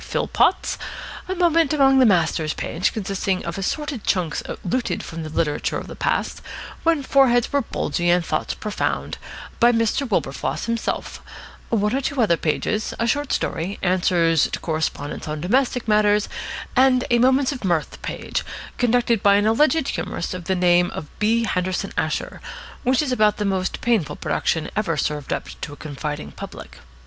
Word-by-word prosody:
Philpotts; 375 - +1 0.5
a 375 - -1
"Moments 330 -4 +3
Among 270 -2 +5
the 255 - +6
Masters" 160 -5 +2
page, 180 +5 -1
consisting 195 -2 -2
of 170 +3 -4
assorted 285 +4 -3
chunks 175 -5 0 0.2
looted 240 +7 -1
from 165 0 -6
the 155 - -5
literature 150 -1 -1
of - - -6
the - - -9
past, - - -1 0.4
when 325 -4 +2
foreheads 255 -3 +3
were 285 - +3
bulgy 175 -6 -1
and 175 -1 +3
thoughts 155 - -2
profound, 210 -1 -3 0.4
by 240 +1 +6
Mr. 230 +3 +1
Wilberfloss 135 - -1
himself; 230 -1 -3 0.5
one 210 +1 +1
or 270 - 0
two 280 +1 -2
other 210 -8 +4
pages; 210 +7 -1
a 230 - 0
short 285 +4 0
story; 175 +5 -1
answers 175 -3 +3
to - - -3
correspondents 155 -3 -3
on 150 0 -3
domestic 245 - +1
matters; 210 -1 +3 0.5
and 255 -1 +4
a 240 - +4
"Moments 260 +2 +4
of 265 -5 -6
Mirth" 170 -5 -1
page, - - -3 0.4
conducted 240 -2 +2
by 200 0 +5
an 205 +1 +3
alleged 295 +6 +3
humorist 170 - -3
of 180 -2 -6
the 190 +2 +1
name 175 -1 +4
of 150 - -6
B. 225 +2 +2
Henderson 185 -3 -1
Asher, - - -2 0.4
which 255 +3 +2
is 275 - -2
about 215 -4 +3
the 210 - -1
most 190 -1 -1
painful 185 -12 +1
production 160 -2 -1
ever 180 -7 0
served 150 -1 -2
up - - -2
to 145 - -5
a - - -9
confiding 145 - -5
public. - - -10
210 Hz, 165 wpm, -22 LUFS, 170-250 Hz, 0.5 s, the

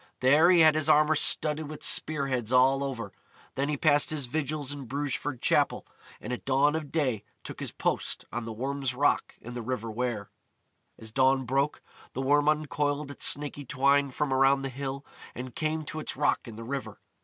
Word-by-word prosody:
There 145 +7 +5
he 175 -2 +6
had 155 -1 +7
his 155 0 0
armour 155 0 +5
studded 150 0 +2
with 155 -1 -8
spear 150 -3 +1
heads 125 -4 -2
all 130 +2 +4
over. 115 -7 -5 0.4
Then 140 +2 -1
he 150 - -1
passed 145 0 +3
his 150 -3 -2
vigils 145 +1 -3
in 140 -2 -6
Brugeford 140 0 -3
Chapel, - - +2 0.3
and 125 - -5
at 125 - -6
dawn 140 +3 +2
of 155 -3 -5
day 130 -10 0 0.2
took - - -8
his - - -5
post - - -2
on 120 -1 -3
the 115 - -5
Worm's 135 +3 -3
Rock 145 +3 +1
in 120 - -9
the 120 - -5
River 115 -1 -4
Wear. 115 -3 -3 0.7
As 110 0 -9
dawn 130 +1 +2
broke, 135 +4 -1 0.3
the 130 - -3
Worm 145 +2 +3
uncoiled 150 -1 -1
its 145 - -1
snaky 145 0 0
twine 140 +2 +2
from 135 +1 -2
around 135 +1 +3
the 135 - -2
hill, 135 +1 -5 0.3
and 125 0 -7
came 160 -1 -2
to 155 - -5
its 155 - -5
rock - - +1
in 115 - -9
the 115 - -8
river. 135 +3 -5
140 Hz, 195 wpm, -28 LUFS, 130-150 Hz, 0.7 s, had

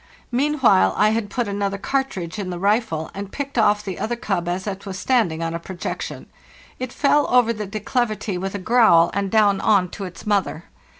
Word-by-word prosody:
Meanwhile 250 - +3
I 210 +1 +4
had 220 -2 -1
put 240 0 -2
another 200 0 -2
cartridge 215 -7 -3
in 190 -2 -4
the 175 - -4
rifle, 200 -4 0
and 200 0 -7
picked 280 -1 -5
off 210 -3 +3
the 190 -3 -5
other 240 +2 -2
cub 190 -7 -2
as 180 +2 -3
it 195 -1 -5
was 190 -1 -5
stand 235 -4 +2
ing 160 +1 -4
on 165 0 -2
a 170 - -3
projection. 175 +1 -6 0.5
It 255 -1 -4
fell 290 +2 +2
over 245 -2 +4
the 210 -2 -5
declivity 215 0 -2
with 190 +2 -4
a - - -1
growl, 185 -5 +4
and 200 0 -1
down 205 -2 +3
on 195 -4 +3
to 195 - -6
its 180 - -10
mother. 200 -5 0
205 Hz, 200 wpm, -22 LUFS, 185-230 Hz, 0.5 s, I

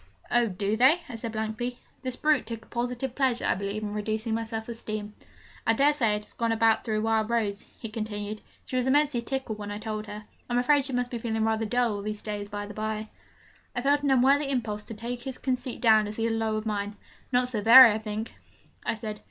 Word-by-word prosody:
'Oh, 240 -1 +4
do 200 +2 -1
they?' 260 +9 +5
I 265 - -8
said 225 0 -5
blankly. 220 +3 -3 0.2
This 255 -2 -3
brute 300 0 +2
took 225 -1 -6
a - - -26
positive 245 +1 -3
pleasure, 260 -3 +1
I - - +3
believe, 200 +3 -3
in 205 -1 -3
reducing 215 +2 -2
my 225 0 -1
self 220 -1 -5
esteem. 215 -3 -5 0.5
'I 225 - +5
dare 280 +5 +4
say 230 -8 +2
it 210 0 -5
has - - -21
got 230 -1 0
about 225 0 +3
through 215 -1 -1
Wild 220 -1 +1
Rose,' 210 -4 -1
he 225 - -6
continued. 215 -1 -5 0.2
'She 255 - -3
was 250 0 +1
immensely 285 -2 +3
tickled 235 -3 -4
when 205 0 -5
I 205 - -4
told 215 0 -4
her. 210 +1 -7 0.3
I'm 240 - +1
afraid 275 +3 +3
she 270 - -4
must 245 0 -1
have 235 -2 -4
been 230 -1 -2
feeling 220 0 +1
rather 225 0 0
dull 245 -1 +2
all - - -5
these 210 0 -4
days, 205 -1 -4
by 205 0 -4
the 205 - -8
bye.' 215 0 -3 0.7
I 245 - -1
felt 285 +1 +3
an 285 - 0
unworthy 275 +2 +4
impulse 225 -6 -1
to 225 - -7
take 240 +3 -5
his 260 +1 -5
conceit 255 -1 -3
down 220 -3 +5
as 210 - -6
he 225 - -2
had 230 0 +1
lowered 220 -1 -1
mine. 205 -1 -2 0.4
'Not 250 0 +2
so 225 -4 -2
very, 235 +2 +10
I 210 - -1
think,' 215 +1 -5 0.5
I - - -1
said. 215 -1 -6
225 Hz, 235 wpm, -27 LUFS, 215-245 Hz, 0.7 s, very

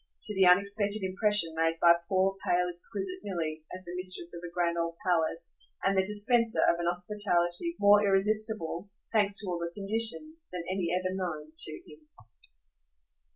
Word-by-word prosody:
to 210 - +3
the 190 -2 +3
unexpected 200 +3 +2
impression 190 -2 +4
made 165 0 0
by 170 0 +6 0.2
poor 190 0 +1
pale 180 0 +1
exquisite 190 +1 -4
Milly 165 -6 -4
as 185 0 -9
the 175 - -8
mistress 180 -1 -4
of 170 - -8
a 175 - -6
grand 170 -1 -1
old 170 0 -3
palace 165 -1 -1 0.3
and 195 0 +1
the 190 - +4
dispenser 220 +3 +2
of 170 - +2
an 170 - -2
hospitality 180 - 0
more 205 +1 +5
irresistible, 205 -2 +1 0.2
thanks 205 -2 +1
to 210 - -2
all 175 -1 -3
the 170 0 -4
conditions, 230 +10 +1
than 180 -2 -5
any 185 -2 -2
ever 185 +1 -1
known 165 -5 -5
to 155 - -1
him. 150 0 -17
185 Hz, 165 wpm, -29 LUFS, 170-205 Hz, 0.3 s, by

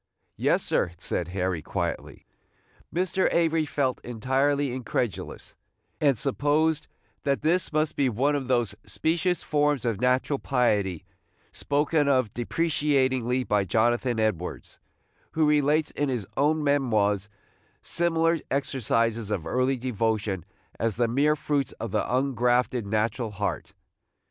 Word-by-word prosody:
"Yes, - - +1
sir," 85 - 0
said 85 -1 -3
Harry, 90 -2 -2
quietly. - - -4 0.7
Mr. 185 +2 +1
Avery 165 -2 +2
felt 135 -4 -1
entirely 135 +3 0
incredulous, 125 -3 -3 0.5
and 140 -5 +3
supposed 150 +5 +1 0.3
that 140 0 -1
this 170 +3 +1
must 155 0 0
be 135 -2 +2
one 135 +6 +1
of 135 -3 -3
those 120 -5 +1
specious 170 +2 0
forms 145 -3 +1
of 115 -3 -1
natural 130 +2 +1
piety 100 - 0 0.5
spoken 145 +1 +1
of 130 -7 +2
depreciatingly 130 -3 +1
by 105 -2 +1
Jonathan 120 +4 +1
Edwards, 95 -5 -2 0.5
who 160 -1 +2
relates 150 +1 +2
in 145 -1 -1
his 120 -6 -2
own 150 +2 +2
memoirs 110 -8 +1 0.5
similar 165 -1 +1
exercises 115 -5 0
of 100 -7 -2
early 130 +1 +1
devotion 110 -6 -1 0.3
as 115 -3 0
the 120 0 +1
mere 145 +6 +2
fruits 145 -2 -1
of 115 - -6
the 105 - +1
ungrafted 125 -2 +1
natural 110 +2 -1
heart. 100 0 -4
130 Hz, 125 wpm, -26 LUFS, 110-145 Hz, 0.7 s, and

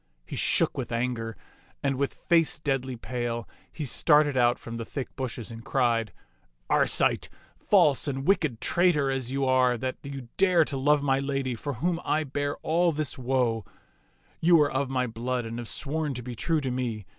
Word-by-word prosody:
He - - -7
shook - - +1
with - - -4
anger, 115 -1 -2 0.5
and 140 -1 +1
with 140 +1 -1
face 165 -2 +2
deadly 135 -3 -2
pale 120 -1 -4 0.2
he 155 - -5
started 150 +2 +3
out 120 -1 +3
from 115 0 -7
the 115 - -4
thick 130 +3 -6
bushes 120 -3 -5
and 115 0 -9
cried, 115 -4 +1 0.3
" - - -41
Arcite, - - +2 0.4
false 145 0 +4
and 135 -1 -3
wicked 155 - +2
traitor 165 -6 +2
as 130 -2 -2
you 135 0 0
are 130 -1 +3
that 130 +3 -3
you 135 -3 -8
dare 180 -4 +4
to 140 - -2
love 145 +2 +3
my 135 -1 +2
lady 135 -2 -1
for 145 +5 -4
whom 165 +8 -1
I 155 +1 +1
bear 145 0 -2
all 170 +2 +2
this 150 -3 -3
woe, 125 -3 0 0.8
you 170 0 +5
are 145 - +2
of 135 0 -1
my 130 -1 0
blood 120 +1 -3
and 115 +1 -5
have 120 - -6
sworn 150 -1 -2
to 125 - -6
be 125 0 -6
true 160 +6 0
to 130 -2 -2
me. 120 -5 -3
130 Hz, 190 wpm, -27 LUFS, 120-145 Hz, 0.8 s, you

